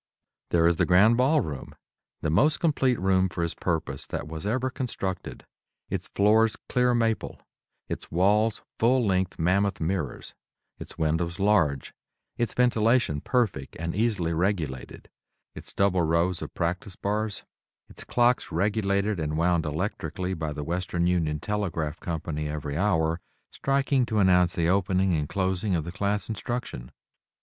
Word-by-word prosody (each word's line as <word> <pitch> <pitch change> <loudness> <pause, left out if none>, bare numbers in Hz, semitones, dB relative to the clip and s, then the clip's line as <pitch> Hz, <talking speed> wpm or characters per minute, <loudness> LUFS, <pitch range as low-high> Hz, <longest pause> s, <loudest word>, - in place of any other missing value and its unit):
There 85 -1 +3
is 85 0 +3
the - - +2
Grand 100 +6 +6
Ball 135 +5 +3
Room, 75 - -6 0.5
the 80 - 0
most 150 - +3
complete 135 -6 +2
room 95 0 +2
for 85 - -3
its 85 0 -2
purpose 80 -6 -3
that 75 - -4
was 80 +4 -6
ever 130 +4 0
constructed; 100 -8 -4 0.5
its - - -3
floors 110 +2 +3
clear 125 -1 +2
maple, 115 -2 -1 0.5
its - - -6
walls 105 +5 +2 0.2
full 125 +1 +3
length 95 -2 0
mammoth 95 +4 +1
mirrors; 80 -5 -3 0.5
its - - -10
windows 85 +3 -1
large, 95 -10 +2 0.4
its 120 -3 -2
ventilation 115 - +2
perfect 110 - -1
and 85 +1 -3
easily 100 -6 0
regulated; 80 -7 -2 0.5
its - - -9
double 95 -2 +2
rows 85 +2 +1
of - - -6
practice 90 +2 -2
bars; 105 0 -2 0.4
its - - -9
clocks 120 +1 +1
regulated 100 +1 0
and 75 -1 -2
wound 85 -1 +2
electrically 90 +2 -3
by 80 -3 -3
the 75 0 -5
Western 85 +1 -1
Union 80 -4 +1
Telegraph 85 -6 -2
Co. 85 -2 -3 0.2
every 75 -1 -3
hour, 85 -3 +1 0.3
striking 135 -2 +1
to 110 - -1
announce 90 -3 +4
the 85 -1 +1
opening 95 0 +2
and 75 -3 -1
closing 95 0 0
of 80 - -1
the 85 - -6
class 100 +3 -1
instruction. 110 - -4
95 Hz, 145 wpm, -26 LUFS, 80-110 Hz, 0.5 s, Grand